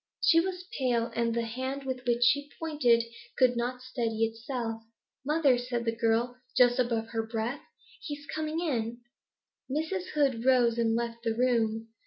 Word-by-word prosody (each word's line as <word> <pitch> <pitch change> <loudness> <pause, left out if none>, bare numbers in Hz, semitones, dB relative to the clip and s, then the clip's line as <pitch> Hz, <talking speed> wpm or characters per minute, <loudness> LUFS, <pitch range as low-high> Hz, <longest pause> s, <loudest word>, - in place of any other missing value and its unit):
She 330 - +6
was 365 +1 -2
pale, 240 -3 +1
and 235 0 +1
the 235 - +1
hand 260 +4 -4
with 260 -1 -4
which 240 0 +3
she 285 +4 +3
pointed 280 -8 +3 0.3
could 250 -1 +4
not 250 +1 -2
steady 230 -3 -1
itself. 225 0 -4 0.4
'Mother,' 285 -3 +3
said 245 -1 -3
the 230 0 0
girl, 230 +2 +1 0.2
just 245 0 +5
above 230 -2 0
her 225 -1 -1
breath, 225 +4 -3
'go! - - -27 0.4
He 295 -5 -4
is 290 - -14
coming 310 +2 -3
in!' 240 -7 -2 0.7
Mrs. 320 +7 -2
Hood 270 -6 +2
rose 245 -3 +4
and 225 -1 +2
left 235 0 -3
the 225 -1 -1
room. 225 -2 +1
245 Hz, 170 wpm, -29 LUFS, 230-270 Hz, 0.7 s, She